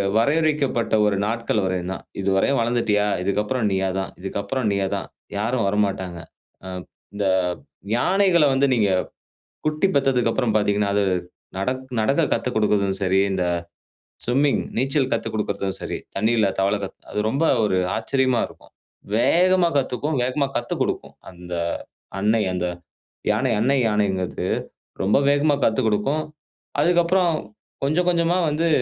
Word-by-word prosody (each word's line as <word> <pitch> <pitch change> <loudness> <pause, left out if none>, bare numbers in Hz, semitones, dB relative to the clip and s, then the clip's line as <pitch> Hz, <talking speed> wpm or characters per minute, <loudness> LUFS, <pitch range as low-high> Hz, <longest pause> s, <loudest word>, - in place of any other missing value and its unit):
வரையறுக்கப்பட்ட 140 -1 +1
ஒரு 105 - +2
நாட்கள் 115 0 -1
வரையும்தான். 95 0 -3 0.2
இதுவரையும் 100 +7 +2
வளர்ந்துட்டியா? 115 -3 +1 0.2
இதுக்கு 100 +2 0
அப்புறம் 115 0 -1
நீயாதான். 95 0 -1
இதுக்கு 95 +2 -4
அப்புறம் 130 +5 -2
நீயாதான். 100 -1 -1 0.3
யாரும் 115 +1 0
வரமாட்டாங்க. 95 -4 -1 0.4
ஆ 95 - -8 0.5
இந்த 100 0 -2 0.7
யானைகள 180 +2 +3
வந்து 135 +1 +3
நீங்க 105 -4 +2 0.8
குட்டி 155 +5 +1
பெத்ததுக்கப்புறம் 125 -4 +2
பார்த்தீங்கன்னா, 105 -1 +1
அது 105 - +3 0.6
நடக் 130 +6 -2 0.2
நடக்க 135 +9 +2
கத்துக்குடுக்கறதும் 105 -5 +1
சரி, 95 0 +3
இந்த 90 -1 0 0.8
ஸ்விம்மிங் 135 +4 +2 0.2
நீச்சல் 135 +2 +1
கத்துக்குடுக்குறதும் 100 -2 -2
சரி, - - -4 0.2
தண்ணீல 110 +1 +2
தவள 100 +2 +2
கத்து 95 - -7
அது - - -4
ரொம்ப 145 +6 0 0.2
ஒரு 100 -3 +1 0.2
ஆச்சரியமா 130 +1 +1
இருக்கும். - - -18 0.4
வேகமா 180 +7 +4
கத்துக்கும், 140 +3 -1
வேகமா 135 +3 0
கத்துக்குடுக்கும். 120 - -2 0.2
அந்த 90 0 -8 0.7
அன்னை, 110 +2 +2
அந்த 90 -1 -1 0.6
யானை 115 +4 +1
அன்னை 135 +4 +3
யானைங்கிறது 100 -4 -1 0.6
ரொம்ப 105 +6 +4
வேகமா 145 0 +3
கத்துக்குடுக்கும். 115 +6 +1 0.6
அதுக்கு 175 0 +4
அப்புறம் 180 -1 +2 0.5
கொஞ்சம் 175 +5 +1
கொஞ்சமா 170 +1 +2
வந்து 160 +3 +1
115 Hz, 120 wpm, -23 LUFS, 100-140 Hz, 0.8 s, வேகமா